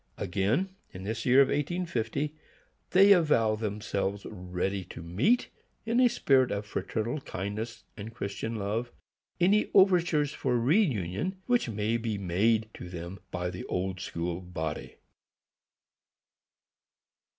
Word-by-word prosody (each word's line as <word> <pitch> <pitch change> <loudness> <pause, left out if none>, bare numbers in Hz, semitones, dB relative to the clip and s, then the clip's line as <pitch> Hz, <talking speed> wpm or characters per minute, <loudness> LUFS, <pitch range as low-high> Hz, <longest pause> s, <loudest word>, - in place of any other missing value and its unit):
Again, 100 - 0 0.2
in 95 - -8
this 110 +6 -3
year 130 +2 +7
of - - -2
1850, 150 -3 -1 0.6
they 195 +2 +6
avow 150 - +4
themselves 100 -2 -3
ready 90 0 -3
to 85 - -9
meet, 115 - +2 0.4
in 230 +2 +1
a 250 -1 +6
spirit 130 - +3
of 100 +1 -3
fraternal 110 +7 -3
kindness 110 +3 -5
and 110 +1 -7
Christian 110 +1 -4
love, 110 +4 -2 0.5
any 195 +4 +3
overtures 175 -6 +4
for 125 -2 0
reünion 130 - +1
which 245 - +2
may 110 +1 0
be 115 -2 -2
made 105 +4 +1
to 90 - -9
them 90 +2 -7
by 90 0 -3
the - - -6
Old 90 0 -2
School 85 0 -3
body. 80 -4 -5
110 Hz, 125 wpm, -29 LUFS, 95-145 Hz, 0.6 s, year